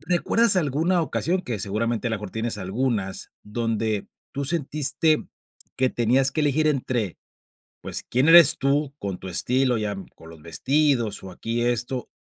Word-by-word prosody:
¿Recuerdas 180 +6 +3
alguna 165 +3 +1
ocasión 180 +3 -1
que 115 -4 -4
seguramente 110 +4 -2
a - - -5
lo 110 - -1
mejor 100 -2 -8
tienes 110 -1 -3
algunas, 100 0 -3
donde 110 -1 -2 0.2
tú 140 0 -3
sentiste 150 0 +1 0.5
que 130 0 +1
tenías 125 +3 +1
que 155 - -1
elegir 150 +2 +2
entre, 125 - -2 0.6
pues, - - -3
quién 130 +6 +2
eres 170 -3 +9
tú 140 +1 0
con 100 -2 -5
tu 95 - -9
estilo, 125 +5 +1
ya 105 -1 -2 0.2
con 80 - -14
los 80 -2 -14
vestidos 125 - 0
o 95 - -8
aquí 115 +5 -3
esto, 120 +1 -1
125 Hz, 155 wpm, -23 LUFS, 110-145 Hz, 0.6 s, eres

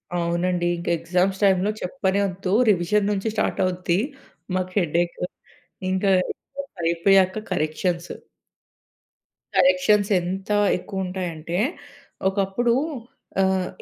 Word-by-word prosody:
అవునండి 175 +1 0
ఇంక 170 - -8
ఎగ్జామ్స్ 180 +4 0
టైంలో 195 +1 +3
చెప్పనె 195 -1 0
ఒద్దు. 185 0 -4 0.2
రివిజన్ 200 +2 +2
నుంచి 205 +2 -1
స్టార్ట్ 215 - 0
అవుద్ది. 180 0 0 0.6
మాకు 185 0 -1
హెడ్ 170 -4 -2
ఏఖ్, 175 - -8 0.7
ఇంకా 195 +1 +2 0.7
అయిపోయాక 185 +4 +3
కరెక్షన్స్. 170 +1 -1 1.4
కరెక్షన్స్ 270 -8 +4
ఎంత 190 +3 -4 0.3
ఎక్కువ 190 +1 -4
ఉంటాయంటే, 175 -2 -3 0.7
ఒకప్పుడు 195 +5 +1 0.7
ఆహ్, 190 -1 +2
185 Hz, 95 wpm, -23 LUFS, 175-195 Hz, 1.4 s, కరెక్షన్స్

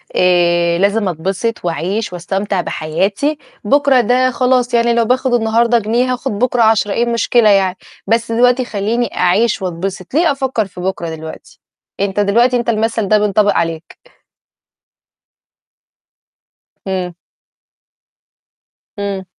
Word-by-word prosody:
آآ، 175 -1 +2
لازم 200 +2 +1
أتبسِط 190 +5 -3
وأعيش 180 +5 -2
وأستمتع 195 +2 -2
بحياتي، 195 - -2 0.3
بُكرة 275 +2 +3
ده 255 +3 +2
خلاص، 250 0 +1
يعني 235 0 +3
لو 235 -1 +2
باخد 255 +2 0
النهارده 235 +1 +2
جنيه، 240 +4 0
هاخد 250 +2 -4
بُكرة 245 0 +1
10، 220 -2 +2
إيه 235 - +1
المشكلة 235 -1 +2
يعني؟ 190 -2 +2 0.3
بس 230 +2 0
دلوقتي 245 +2 +2
خلّيني 220 +1 -2
أعيش 195 +5 +1
وأتبسِط، 185 +2 -5
ليه 330 +2 +3
أفكر 265 -5 -1
في 180 -2 -11
بكرة 180 -2 -3
دلوقتي؟ 160 0 -11 0.4
أنت 200 0 -1
دلوقتي 235 +5 +3
أنت 240 0 -2
المثل 225 -1 0
ده 215 - +4
بينطبق 205 0 +2
عليك. 165 0 -3 2.9
إمم. 185 -2 -3 1.9
إمم. 200 -2 -4
215 Hz, 120 wpm, -16 LUFS, 190-240 Hz, 2.9 s, ده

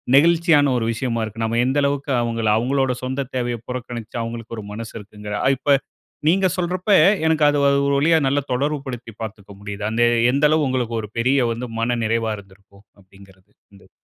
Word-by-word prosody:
நெகிழ்ச்சியான 160 -2 +4
ஒரு 115 - -1
விஷயமா 115 -1 -2
இருக்கும். 110 +1 -4
நம்ம 115 +1 0
எந்த 130 +3 0
அளவுக்கு 140 0 -1
அவங்க 115 -1 -2 0.2
அவங்களுடைய 130 +1 0
சொந்த 130 +2 -2
தேவைய 120 -1 -1
புறக்கணிச்சு 120 -2 -6
அவங்களுக்கு 115 0 -6
ஒரு 105 - -8
மனசு 115 +1 -7
இருக்குங்கிற 105 0 -7 0.2
இப்ப 140 +2 +3 0.5
நீங்க 190 +3 +4
சொல்றப்ப 180 +3 -1 0.3
எனக்கு 160 -1 +2
அது 145 0 +2 0.3
ஒரு 140 - +1
வழியா 160 +4 +4
நல்லா 140 +2 +1
தொடர்பு 145 +4 0
படுத்தி 120 -3 -7
பார்த்துக்க 105 -2 -8
முடியுது. 100 0 -7
அந்த 115 +2 +2 0.3
எந்த 140 +3 +2
அளவுக்கு 155 -3 +2
உங்களுக்கு 125 -3 -1
ஒரு 105 - -8
பெரிய 130 +2 +2
வந்து 120 +2 -4
மன 120 +1 0
நிறைவா 115 0 0
இருந்திருக்கும் 100 +1 -18 0.2
அப்படிங்கிறது. 95 0 -20 0.2
அந்தது. 100 - -19
120 Hz, 170 wpm, -21 LUFS, 110-140 Hz, 0.5 s, நெகிழ்ச்சியான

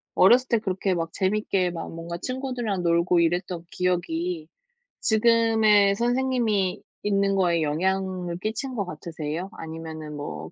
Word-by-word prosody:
어렸을 245 +7 +6
때 235 -3 +2
그렇게 190 -2 -1
막 165 -1 -2
재밌게 190 -2 0
막 165 -1 -6
뭔가 165 +1 -6
친구들이랑 250 -3 -3
놀고 170 +1 +3
이랬던 175 +1 0
기억이 175 -2 -1 0.5
지금의 220 -3 +4
선생님이 240 -5 +1 0.2
있는 200 -1 +2
거에 175 -3 +2
영향을 180 +2 -1
끼친 220 +6 -3
것 205 -4 -1
같으세요? 160 +1 -5
아니면은 160 -1 -7
뭐 80 - -6
185 Hz, 305 characters per minute, -25 LUFS, 170-215 Hz, 0.5 s, 어렸을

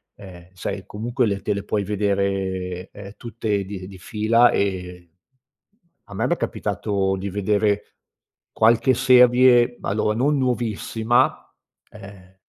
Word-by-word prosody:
ehm, 90 -3 -13
sai, 90 - -5
comunque 120 +4 -2
le 100 -2 -2
te 105 - -1
le 100 - -4
puoi 105 0 -2
vedere, 95 -2 -2
ehm, 100 -1 -11
tutte 110 -3 -3
di 95 -1 -8
di 95 - -12
fila. 115 +5 +2
Ehm, 90 -3 -3 1.0
a - - -13
me, - - 0
m'è - - 0
capitato 95 -2 -2
di 100 +1 -5
vedere 100 +1 -1 0.6
qualche 115 +4 +3
serie 125 -1 +5
allora, 105 +1 -1
non 140 +4 +2
nuovissima, 120 -1 0 0.4
ehm, 100 -2 -14
105 Hz, 125 wpm, -22 LUFS, 95-120 Hz, 1.0 s, serie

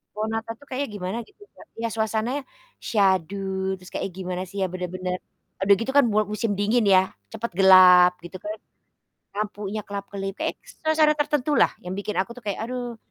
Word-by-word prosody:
Pohon 215 +1 -2
Natal 225 0 -3
tuh 285 - -17
kayaknya 275 +2 -2
gimana 185 +2 -4
gitu, 415 0 -23
Kak. - - -15
Ya 230 - 0
suasananya 225 +5 -1 0.4
syahdu 190 -1 0
terus 180 0 -14
kayak - - -3
gimana 185 -1 -4
sih 200 +2 -8
ya, - - +3
bener-bener 180 0 -3 0.4
eee, - - +1
udah 200 - +8
gitu 230 +4 -2
kan 285 - +7
mua 215 0 +3
musim 210 +1 -1
dingin 215 +3 +2
ya, 190 -1 +4 0.2
cepet 225 +1 -4
gelap 185 -2 +8
gitu 175 +2 -8
kan. 210 +1 -4 0.8
Lampunya 210 0 -3
kelap-kelip 200 -1 -5
kayak - - -1
suasana 315 -10 +2
tertentulah 295 -1 +2 0.2
yang 180 - -5
bikin 205 +1 -4
aku 195 - -3
tuh - - -9
kayak, 200 - -2
"Aduh." 245 0 -5
205 Hz, 180 wpm, -24 LUFS, 190-230 Hz, 0.8 s, udah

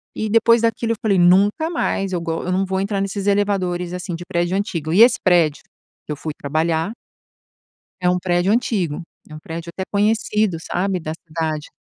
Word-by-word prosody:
e 220 - -2
depois 230 +1 +4
daquilo 230 0 0
eu - - -4
falei: 210 -5 +2
"Nunca 200 - +4
mais 195 - -1
eu 175 - -1
go 165 -1 -3
eu 180 - -2
não 190 +1 +1
vou 190 0 -2
entrar 200 0 -1
nesses 195 0 -3
elevadores 185 -3 0
assim 180 0 -4
de 175 - -7
prédio 175 +1 -1
antigo." 165 -6 -2
E 195 - +5
esse 240 +2 +7
prédio 170 -5 +3 0.4
que - - -6
eu - - -2
fui 155 - -5
trabalhar 160 +5 0 1.1
é 180 - +2
um 180 - +2
prédio 175 +1 +1
antigo, 190 -9 0 0.3
é 155 - -11
um - - -8
prédio 165 +2 -7
até 190 +2 -5
conhecido, 210 -3 +1
sabe, 185 +2 -2
da 155 -1 -4
cidade. 155 -2 -3
185 Hz, 195 wpm, -20 LUFS, 170-205 Hz, 1.1 s, esse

